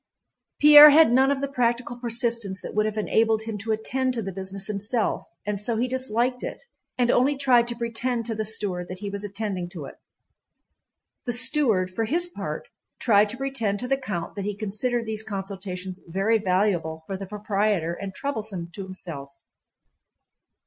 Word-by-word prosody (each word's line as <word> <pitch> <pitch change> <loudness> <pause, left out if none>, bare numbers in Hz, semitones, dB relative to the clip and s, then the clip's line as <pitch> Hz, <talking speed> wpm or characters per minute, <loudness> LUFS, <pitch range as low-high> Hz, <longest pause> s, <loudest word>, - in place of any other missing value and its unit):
Pierre 295 0 +11
had 310 -3 +6
none 265 +2 +5
of 280 -1 0
the 280 - 0
practical 245 -2 0
persistence 235 -4 -1
that - - -6
would 215 +1 +2
have 215 0 -4
enabled 220 +1 +2
him 220 -2 -5
to 220 +2 -3
attend 255 +4 -1
to 230 - -2
the 195 - -4
business 190 +1 -5
himself 210 +3 -1 0.2
and 205 -1 -2
so 225 +1 -1
he 245 +3 +1
disliked 250 -1 -1
it - - -6 0.3
and 245 -1 +3
only 270 +3 +3
tried 250 -4 +4
to 240 - -3
pretend 235 0 -2
to 230 - -2
the 220 0 -2
steward 195 -4 -2
that 185 - -7
he 200 +1 -5
was 200 0 -5
attending 200 -3 -3
to 170 -6 -8
it. - - -9 1.3
The 240 - 0
steward 230 -7 +2
for 225 +3 -1
his 340 +9 0
part 350 - -6 0.3
tried 210 -3 +4
to 235 - -5
pretend 235 -7 -1
to 250 - -3
the 270 - +2
count 210 -11 -5
that 200 -1 -5
he 205 -1 -2
considered 230 +3 -2
these 220 -1 -2
consultations 190 -3 -6
very 195 +6 +1
valuable 180 -5 0
for 195 - -4
the 195 0 -7
proprietor 205 -4 0
and 195 +2 -6
troublesome 210 -8 -4
to 195 - -6
himself. 170 -7 -8
215 Hz, 180 wpm, -25 LUFS, 195-245 Hz, 1.3 s, Pierre